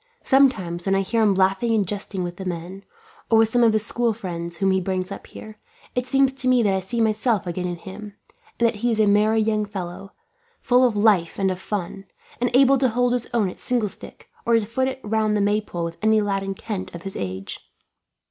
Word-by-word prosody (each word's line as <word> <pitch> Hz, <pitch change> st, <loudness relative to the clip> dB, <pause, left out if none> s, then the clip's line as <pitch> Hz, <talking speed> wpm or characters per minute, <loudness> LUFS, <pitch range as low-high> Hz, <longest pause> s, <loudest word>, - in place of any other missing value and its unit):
Sometimes, 200 Hz, -11 st, +2 dB
when 195 Hz, -, +3 dB
I 195 Hz, -, +2 dB
hear 225 Hz, +4 st, 0 dB
him 205 Hz, -3 st, +3 dB
laughing 195 Hz, +5 st, +2 dB
and 205 Hz, -4 st, +1 dB
jesting 200 Hz, -1 st, -4 dB
with 175 Hz, 0 st, -5 dB
the 190 Hz, -, -6 dB
men, 180 Hz, +2 st, -6 dB, 0.5 s
or 225 Hz, -, +5 dB
with 225 Hz, 0 st, +4 dB
some 245 Hz, +2 st, +2 dB
of 230 Hz, -, +5 dB
his 215 Hz, 0 st, 0 dB
school 235 Hz, 0 st, 0 dB
friends 170 Hz, -5 st, -6 dB
whom 195 Hz, +3 st, +2 dB
he 190 Hz, 0 st, +1 dB
brings 185 Hz, 0 st, -2 dB
up -, -, -8 dB
here, 215 Hz, -1 st, -11 dB, 0.3 s
it 250 Hz, 0 st, -2 dB
seems 270 Hz, 0 st, +3 dB
to 265 Hz, -1 st, -5 dB
me 250 Hz, -2 st, +4 dB
that 200 Hz, -2 st, +2 dB
I 190 Hz, -, +1 dB
see 190 Hz, +6 st, -2 dB
myself 220 Hz, -1 st, +1 dB
again 180 Hz, +1 st, -3 dB
in 175 Hz, -, -3 dB
him; 205 Hz, +3 st, -10 dB, 0.4 s
and 235 Hz, -, +3 dB
that 230 Hz, -2 st, -2 dB
he 240 Hz, +4 st, 0 dB
is 220 Hz, -, -1 dB
a 215 Hz, -, +5 dB
merry 210 Hz, +2 st, +3 dB
young 215 Hz, -1 st, +1 dB
fellow, 195 Hz, -1 st, -7 dB, 0.5 s
full 250 Hz, +1 st, +3 dB
of 230 Hz, -4 st, +1 dB
life 205 Hz, -6 st, +3 dB
and 190 Hz, -1 st, +1 dB
fun, 195 Hz, -1 st, -5 dB, 0.3 s
and 245 Hz, 0 st, +1 dB
able 270 Hz, 0 st, +5 dB
to 260 Hz, -1 st, +3 dB
hold 245 Hz, +1 st, +1 dB
his 245 Hz, -1 st, -1 dB
own 225 Hz, -4 st, +1 dB
at 180 Hz, -, -8 dB
singlestick, 235 Hz, -5 st, -3 dB, 0.2 s
or 235 Hz, -, +3 dB
to 225 Hz, -2 st, +2 dB
foot 260 Hz, +5 st, -1 dB
it 265 Hz, 0 st, -5 dB
round 215 Hz, 0 st, +1 dB
the -, -, 0 dB
maypole 205 Hz, -4 st, -1 dB
with 170 Hz, 0 st, -5 dB
any 220 Hz, 0 st, +4 dB
lad 200 Hz, -2 st, 0 dB
in 195 Hz, 0 st, -4 dB
Kent 195 Hz, -3 st, -5 dB
of 170 Hz, -, -9 dB
his 195 Hz, -, -5 dB
age. 95 Hz, 0 st, -5 dB
210 Hz, 230 wpm, -23 LUFS, 190-230 Hz, 0.5 s, or